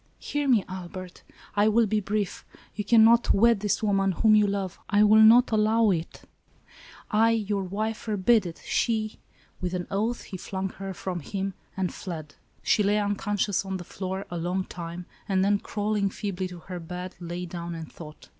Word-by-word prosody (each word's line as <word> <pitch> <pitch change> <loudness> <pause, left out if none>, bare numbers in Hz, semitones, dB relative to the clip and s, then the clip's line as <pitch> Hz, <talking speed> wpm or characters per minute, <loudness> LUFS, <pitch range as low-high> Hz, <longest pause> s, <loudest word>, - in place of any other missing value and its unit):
" - - -39
Hear 290 -1 0
me, 230 -7 +4
Albert! 185 -1 -8 0.3
I 205 +1 +4
will 225 +2 +4
be 215 +1 +1
brief. 205 -1 -2 0.3
You 210 - -3
can 225 +2 +6
not 235 +1 +5
wed 230 +1 +4
this 210 +1 -1
woman, 195 -2 +2
whom 215 +4 +4
you 210 -1 +5
love. 195 -2 -3
I 205 0 +4
will 215 +1 +7
not 235 +3 +7
allow 220 0 +3
it! 165 -2 -4 0.9
I, 225 +1 +4
your 210 -3 0
wife, 215 +4 -2
forbid 215 -1 +2
it! 165 - -10
She 220 -2 0
— - - -31
" - - -34
With 180 0 -2
an 175 -1 -3
oath, 220 +5 -1
he 190 - -7
flung 190 +1 -4
her 195 0 -7
from 180 -1 -4
him, 195 +4 -4 0.2
and 190 -2 -1
fled. 160 -6 -7 0.3
She 215 - +3
lay 205 +1 +2
unconscious 205 -1 0
on 190 -1 -3
the 180 - -7
floor, 190 +2 -5
a 175 - -3
long 180 +3 -1
time; 170 0 -7 0.2
and, 190 -1 +2
then, 205 0 +3
crawling 205 -1 -1
feebly 190 -2 -4
to 180 -2 -10
her 180 +2 -7
bed, 180 +2 -6
lay 175 +1 -5
down 170 -1 -6
and 160 -1 -8
thought. 155 -2 -12
195 Hz, 195 wpm, -26 LUFS, 180-215 Hz, 0.9 s, will